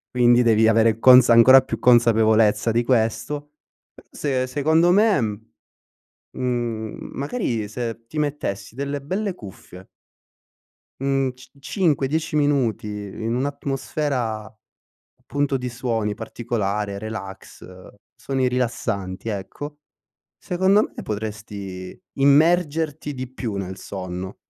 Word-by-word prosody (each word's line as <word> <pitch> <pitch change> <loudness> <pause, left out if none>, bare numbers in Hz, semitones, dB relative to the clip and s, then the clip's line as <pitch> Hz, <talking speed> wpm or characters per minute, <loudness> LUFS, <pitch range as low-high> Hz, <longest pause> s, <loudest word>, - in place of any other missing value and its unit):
Quindi 120 0 +5
devi 110 -1 +4
avere 115 0 +3
consa 125 -1 +7
ancora 130 +3 +8
più 130 - -5
consapevolezza 115 -2 +4
di 120 +1 +2
questo, 125 +5 -1 0.6
se 130 -3 -1
secondo 160 +6 +2
me, 205 -1 +4
uhm, 110 -2 -2 0.9
mhmm, 120 -4 -3
magari 135 - -2
se 115 0 -5
ti 155 - -7
mettessi 145 -8 -3
delle 140 +1 -3
belle 190 +6 -3
cuffie 95 - -12 1.1
mhmm, 135 -1 +1
c 130 - -17
5-10 155 -3 0
minuti 140 -8 +1
in 105 +2 -4
un'atmosfera 135 -5 -3 0.7
punto 145 -1 0
di 125 -1 -4
suoni, 115 -4 -2
particolare, 105 -3 -3
relax, 105 -3 -8 0.5
suoni 130 -2 -1
rilassanti, 115 -5 -3
ecco. 145 +9 -6 0.6
Secondo 190 +4 +2
me - - -6
potresti 105 -3 -6
immergerti 150 +1 +2
di 130 -1 -6
più 115 -5 -5
nel 95 -1 -5
sonno. 95 -1 -6
120 Hz, 105 wpm, -22 LUFS, 110-145 Hz, 1.1 s, ancora